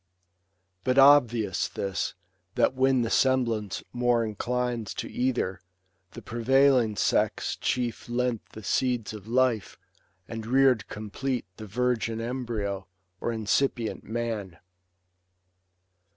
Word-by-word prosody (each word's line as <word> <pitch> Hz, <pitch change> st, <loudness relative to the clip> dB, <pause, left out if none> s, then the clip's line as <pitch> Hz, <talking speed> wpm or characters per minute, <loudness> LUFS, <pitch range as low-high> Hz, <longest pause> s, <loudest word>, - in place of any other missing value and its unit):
But 130 Hz, +1 st, +1 dB
obvious 120 Hz, -8 st, +5 dB
this, 95 Hz, -1 st, -3 dB, 0.4 s
that -, -, +3 dB
when 130 Hz, -1 st, +3 dB
the 115 Hz, -, -2 dB
semblance 115 Hz, -6 st, +1 dB
more 120 Hz, -1 st, +2 dB
Inclines 120 Hz, +1 st, -2 dB
to -, -, -4 dB
either, 120 Hz, -7 st, -1 dB, 0.5 s
the -, -, -9 dB
prevailing 125 Hz, -1 st, +3 dB
sex -, -, +1 dB
Chief 120 Hz, -2 st, -2 dB
lent 120 Hz, -2 st, -1 dB
the 110 Hz, -, -9 dB
seeds 120 Hz, +1 st, 0 dB
of 105 Hz, -1 st, -10 dB
life, 120 Hz, -5 st, +1 dB, 0.5 s
and 115 Hz, -1 st, -6 dB
rear'd 130 Hz, -3 st, +3 dB
complete 115 Hz, +5 st, -3 dB
The 110 Hz, -, -8 dB
virgin 115 Hz, 0 st, 0 dB
embryo, 115 Hz, -5 st, -3 dB, 0.3 s
or 120 Hz, -, -2 dB
incipient 115 Hz, +1 st, 0 dB
man. 110 Hz, -6 st, -4 dB
120 Hz, 110 wpm, -27 LUFS, 110-125 Hz, 0.5 s, obvious